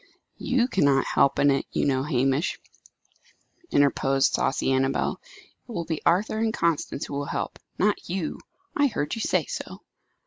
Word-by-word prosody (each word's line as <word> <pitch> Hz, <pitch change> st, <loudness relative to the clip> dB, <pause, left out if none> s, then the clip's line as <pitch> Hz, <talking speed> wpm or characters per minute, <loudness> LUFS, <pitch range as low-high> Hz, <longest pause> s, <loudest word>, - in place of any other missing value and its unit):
"You 255 Hz, -2 st, +1 dB
cannot 140 Hz, -, +3 dB
help 140 Hz, -, +2 dB
in 145 Hz, -, +4 dB
it, 135 Hz, -, 0 dB
you -, -, 0 dB
know, 130 Hz, -2 st, +2 dB
Hamish," 135 Hz, +3 st, 0 dB, 1.1 s
interposed 135 Hz, -1 st, +2 dB
saucy 135 Hz, -, +1 dB
Annabel. 135 Hz, +1 st, 0 dB, 0.5 s
"It -, -, -7 dB
will 170 Hz, -6 st, -3 dB
be 160 Hz, -2 st, -3 dB
Arthur 205 Hz, +5 st, +2 dB
and 225 Hz, 0 st, +1 dB
Constance 165 Hz, -6 st, -1 dB
who -, -, -8 dB
will 140 Hz, 0 st, -2 dB
help -, -, -4 dB, 0.2 s
not 205 Hz, -2 st, 0 dB
you. 175 Hz, -3 st, -3 dB, 0.4 s
I 290 Hz, 0 st, +4 dB
heard 180 Hz, -, -2 dB
you 225 Hz, -, -3 dB
say -, -, +1 dB
so!" -, -, -7 dB
145 Hz, 160 wpm, -25 LUFS, 135-200 Hz, 1.1 s, in